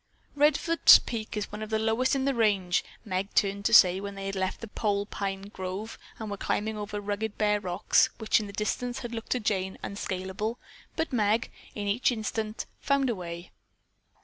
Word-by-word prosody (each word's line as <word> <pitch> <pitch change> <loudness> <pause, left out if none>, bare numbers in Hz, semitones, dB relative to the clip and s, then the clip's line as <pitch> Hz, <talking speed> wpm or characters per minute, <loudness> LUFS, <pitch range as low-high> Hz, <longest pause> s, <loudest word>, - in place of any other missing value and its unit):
"Redfords 300 +3 +6
Peak 220 -2 -4
is 210 - -3
one 210 +1 -6
of 215 - -5
the 220 - +1
lowest 225 +5 +1
in 270 -1 0
the 275 - +2
range," 200 -6 +2 0.2
Meg 190 0 -3
turned 200 0 +1
to - - +2
say 180 0 +7
when 200 0 -6
they 195 0 -6
had 195 0 -3
left 190 -1 -2
the 230 - -6
pole 205 -1 -1
pine 195 -1 -4
grove 200 +2 -6 0.2
and 220 -2 -6
were 205 - -3
climbing 215 +2 -1
over 210 0 -4
rugged 205 +1 -3
bare 210 -1 +2
rocks 180 -3 +2
which 220 0 +2
in 210 - -5
the 200 - -9
distance 245 +4 -2
had 240 -1 -6
looked 225 -1 -6
to 250 - -1
Jane 190 -4 -1
unscaleable, 200 +3 -3 0.4
but 320 -3 -2
Meg, 220 0 +1 0.2
in 205 - -3
each 220 +6 +2
instance, 220 -1 -3
found 275 -3 +1
a - - -2
way. 170 -1 -7
210 Hz, 195 wpm, -28 LUFS, 195-225 Hz, 0.4 s, say